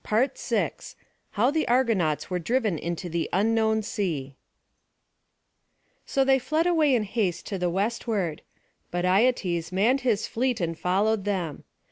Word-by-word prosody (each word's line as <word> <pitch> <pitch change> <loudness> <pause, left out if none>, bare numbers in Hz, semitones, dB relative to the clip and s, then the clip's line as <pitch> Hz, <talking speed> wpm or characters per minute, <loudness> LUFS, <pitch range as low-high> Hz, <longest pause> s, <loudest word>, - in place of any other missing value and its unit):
PART 255 - 0
V - - +1 0.7
How 235 +6 +2
the 310 +1 0
Argonauts 225 - +1
Were 180 -1 -2
Driven 215 - 0
into 170 +1 -4
the 170 -1 -2
Unknown 220 +2 +2
Sea 155 -11 -3 1.7
So 270 - +2
they 270 0 +4
fled 310 +6 0
away 315 -6 +3
in 225 - +1
haste 200 -4 -2
to 195 - -4
the 180 0 0
westward: 195 -3 -1 0.5
but 175 0 -2
Aietes 185 -5 +1
manned 225 +9 +2
his 230 -4 +1
fleet 245 0 -1
and 165 -2 -2
followed 200 +5 +1
them. 180 -7 -3
210 Hz, 140 wpm, -26 LUFS, 175-245 Hz, 1.7 s, they